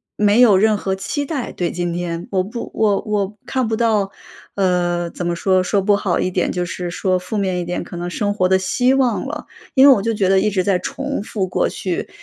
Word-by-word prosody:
没 210 +2 +3
有 225 -5 +7
任 215 +2 +3
何 190 -1 -2
期 285 +9 -3
待 275 -4 -4
对 175 -1 -2
今 175 0 -2
天。 170 0 -4
我 185 -1 +1
不 230 +4 -6
我 210 -3 +2
我 210 -1 -2
看 260 -3 0
不 220 - 0
到， 215 -4 +1 0.4
呃， 175 -2 0
怎 175 - -6
么 175 0 0
说， 185 +1 +2
说 200 +2 +1
不 205 +1 +3
好 200 -3 0
一 - - 0
点 180 - 0
就 180 -1 -2
是 175 0 -5
说 185 +1 0
负 180 +4 -6
面 190 -3 0
一 175 - -3
点， 175 +1 -3
可 175 - -9
能 175 0 -4
生 205 +2 -1
活 185 -2 +2
的 190 0 +4
希 250 +7 +2
望 255 -4 +1
了， 300 +2 -6 0.3
因 270 +1 +7
为 275 - +9
我 200 - -1
就 230 +1 0
觉 200 -3 +1
得 190 0 +4
一 210 +2 +2
直 190 -2 +1
在 195 -1 +2
重 280 -1 -4
复 200 -3 -3
过 185 - 0
去 180 -3 -4
195 Hz, 260 characters per minute, -19 LUFS, 180-220 Hz, 0.4 s, 为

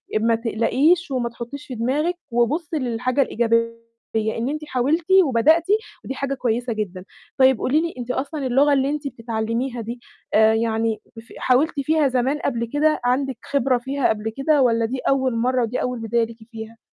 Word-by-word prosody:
أ - - +3
ما 230 +1 +2
تقلقيش 265 - +1
وما 245 -2 -1
تحطيش 235 +4 -8
في 255 - -6
دماغِك 290 +10 0 0.2
وبُصي 295 +7 0
للحاجة 250 +2 0
الإيجابية 230 -1 +1 0.4
إن 220 +3 -1
أنتِ 305 +1 -4
حاولتِ 295 +5 0 0.2
وبدأتِ، 310 +6 +3 0.4
ودي 265 - -4
حاجة 275 0 -2
كويسة 240 -1 -1
جدًا. 190 -3 -5 0.3
طيب 260 -2 +5
قولي 300 +5 +2
لي 335 0 -3
أنتِ 245 0 -4
أصلًا 280 +2 -3
اللغة 280 +3 +4
اللي 270 0 +2
أنتِ 295 -1 -3
بتتعلميها 230 +1 -3
دي 235 +2 -6 0.3
آآ 220 +1 +5
يعني 225 -1 0 0.2
ف 230 - -17
حاولتِ 280 +4 +2
فيها 305 +1 +2
زمان 260 +3 0
قبل 235 0 -1
كده، 305 +1 +2
عندِك 260 0 0
خبرة 265 -2 +2
فيها 270 +2 -1
قبل 220 0 -1
كده 290 +1 +3
والّا 230 -2 +3
دي 255 +3 -3
أول 260 -3 +1
مرة 250 +2 +1
ودي 230 +2 -2
أول 250 -1 -2
بداية 230 +1 0
ليكِ 230 0 -12
فيها؟ 225 0 -9
250 Hz, 175 wpm, -22 LUFS, 230-280 Hz, 0.4 s, طيب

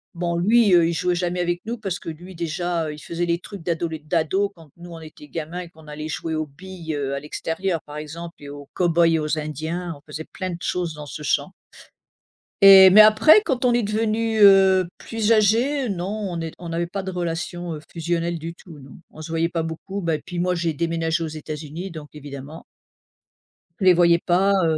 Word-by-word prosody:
Bon, 170 0 -2
lui, 210 +3 +4
heu, 170 -1 +6
il 170 - -1
jouait 180 +2 0
jamais 180 0 -2
avec 175 0 -1
nous 235 +2 -4
parce 195 -3 -3
que, - - -14
lui, 175 +3 -10
déjà, 170 -1 -2
il 150 - -9
faisait 170 +3 -3
les 170 0 0
trucs 195 -2 -10
d'adole 165 -1 -2
d'ado, 180 +5 +1
quand 160 -3 -17
nous 175 0 -11
on 165 - -8
était 155 -1 -13
gamins 165 +3 -5
et 175 - -9
qu'on 160 -2 -18
allait 150 +1 -6
jouer 160 +1 -4
aux 155 0 -1
billes, 170 +1 -8
heu, 140 -1 -2
à - - -3
l'extérieur, 165 +4 -3
par 150 0 -9
exemple 165 +3 -8
et 145 -1 -10
aux 145 -1 -10
cow-boys 170 -1 +3
et 165 -1 +2
aux 155 +1 -1
indiens, 160 +4 -4
on 145 - -16
faisait 155 +2 -6
plein 185 -1 -6
de 170 - -5
choses 175 -3 -2
dans 150 -1 -8
ce 150 - -8
champ. - - 0 1.1
Et 195 -1 +10
mais 210 +3 +9
après 220 - +7
quand 260 -4 -1
on 240 - +4
est 240 -2 +2
devenu, 220 +1 0
heu, 190 -2 +6
plus 225 -1 -2
âgé, 235 +5 +3
non 180 -1 -3
on 200 -4 -4
n'est 165 -1 -4
on 170 -1 -8
n'avait 170 +1 -2
pas 195 +2 -5
de 190 - -4
relation, 175 -1 -4
heu, - - -7
fusionnelle 170 0 -2
du 165 +2 -7
tout, 165 -6 -14
non. 135 0 -13
On 155 - -11
se 160 - -8
voyait 165 0 +1
pas 170 -1 -2
beaucoup, 165 +5 -5
bah, 165 -2 0
et - - -6
puis 175 -1 -5
moi 180 0 +1
j'ai 170 -2 -1
déménagé 165 +1 -1
aux - - -2
États-Unis, 155 +3 -7
donc 155 -2 -9
évidemment. 145 +1 -9 1.2
Les 185 -2 +6
voyais 170 -1 +5
pas, 190 +4 +2
heu 160 -1 +1
170 Hz, 220 wpm, -22 LUFS, 160-190 Hz, 1.2 s, Et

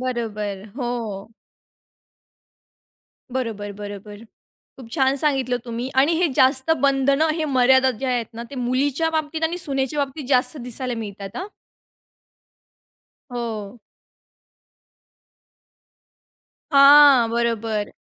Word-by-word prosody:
बरोबर, 215 -6 -4
हो. 230 -5 -4 2.0
बरोबर, 225 -5 -4
बरोबर. 205 +1 -9 0.5
खूप 230 -3 -12
छान 270 -2 +2
सांगितलं 270 -4 0
तुम्ही. 235 +1 -4
आणि 275 +5 +3
हे 350 -2 +2
जास्त 260 +3 +3
बंधन 275 +1 +2
हे 320 - -2
मर्यादा 260 -1 +4
जे 270 - -1
आहेत 245 -3 -1
ना, 235 - -6
ते 280 - -8
मुलीच्या 275 +6 0
बाबतीत 315 0 -3
आणि 335 +2 -1
सुनेच्या 280 -2 -1
बाबतीत 275 +2 -9
जास्त 255 +1 +2
दिसायला 250 0 -4
मिळतात 200 -1 -9
हां. 370 - -4 1.8
हो. 230 -2 -5 2.9
हां, 280 -3 +7
बरोबर. 230 -2 -1
255 Hz, 100 wpm, -22 LUFS, 230-280 Hz, 2.9 s, हां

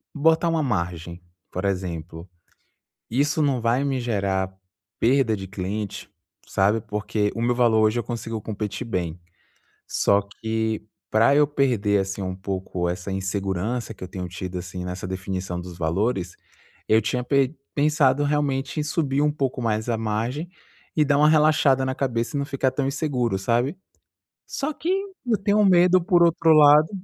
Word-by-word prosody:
botar 160 +3 +3
uma 165 -2 +1
margem, 85 - -3 0.3
por 90 - -4
exemplo, 85 -3 -4 0.8
isso 145 +6 +1
não 135 -4 +1
vai 120 +4 +1
me 135 -2 0
gerar 95 -4 -1 0.5
perda 120 -2 +3
de 95 - -7
cliente, 100 +2 -5 0.4
sabe? 105 +3 +2
Porque 105 0 -2
o 115 - -3
meu 120 0 +1
valor 120 -3 +3
hoje 110 +2 +2
eu - - -2
consigo 115 -2 -5
competir 105 +2 -4
bem. 90 -5 -3 0.7
Só 100 0 +2
que, 110 +2 -3 0.3
para 115 +5 +4
eu 150 0 +5
perder 120 -8 +1
assim 95 +1 -4
um 95 -1 -3
pouco 95 -2 -3
essa 90 +2 -4
insegurança 95 +4 -2
que - - -10
eu - - -5
tenho 90 -1 -6
tido 90 0 -5
assim 90 0 -6
nessa 90 0 -5
definição 95 -1 -4
dos 90 0 -8
valores, 90 +3 -1 0.5
eu 110 +1 +4
tinha 125 +3 -1
pe 140 +2 +1 0.2
pensado 145 -2 +3
realmente 145 -1 -1
em - - 0
subir 150 -3 0
um 150 0 +3
pouco 135 -3 -2
mais 110 -1 -1
a 115 - +1
margem 115 +9 -2 0.5
e 155 - +4
dar 140 0 +2
uma 150 +1 +5
relaxada 150 -3 +4
na 130 0 -2
cabeça 125 +1 -2
e - - 0
não 140 - -1
ficar 135 -2 0
tão 135 +1 -1
inseguro, 130 -8 -1
sabe? 120 - 0 0.7
Só 290 +2 -3
que, 330 - -4 0.4
eu 220 -3 +3
tenho 205 +2 +2
medo 180 -1 +5
por 175 0 +4
outro 165 -1 +4
lado 150 0 +7
115 Hz, 165 wpm, -24 LUFS, 95-140 Hz, 0.8 s, lado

